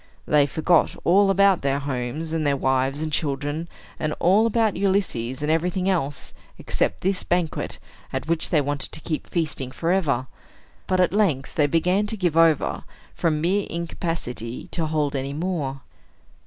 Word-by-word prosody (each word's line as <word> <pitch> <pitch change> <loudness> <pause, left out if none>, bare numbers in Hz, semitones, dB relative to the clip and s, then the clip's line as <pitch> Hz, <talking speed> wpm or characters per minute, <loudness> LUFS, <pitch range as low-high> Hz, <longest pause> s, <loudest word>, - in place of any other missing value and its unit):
They 145 -1 +4
forgot 160 +3 +2
all 195 +3 +5
about 195 -1 +4
their 140 0 +1
homes, 140 +3 -3
and 160 -1 0
their 140 -1 +2
wives 135 +2 0
and 155 -1 -4
children, 145 +3 -1 0.3
and 155 -1 -1
all 200 +6 +4
about 225 -2 +1
Ulysses, 150 - 0
and 150 - +1
everything 180 +3 0
else, 145 -7 -1 0.2
except - - -1
this 190 0 0
banquet, 175 -3 -1 0.3
at 130 +2 -4
which 165 -1 +1
they 155 - +3
wanted 145 0 -3
to - - -4
keep 155 -1 -3
feasting 155 -6 -2
forever. 155 -4 0 0.6
But 185 0 +2
at 180 - +2
length 175 -11 +1
they 150 -2 +3
began 180 +7 +2
to 220 - -3
give 175 -5 0
over, 165 -2 +3 0.3
from 155 -3 0
mere 190 +5 +1
incapacity 160 -8 -4
to 165 -2 -1
hold 150 -2 0
any 135 +1 -2
more. 150 -5 -3
160 Hz, 160 wpm, -24 LUFS, 140-180 Hz, 0.6 s, all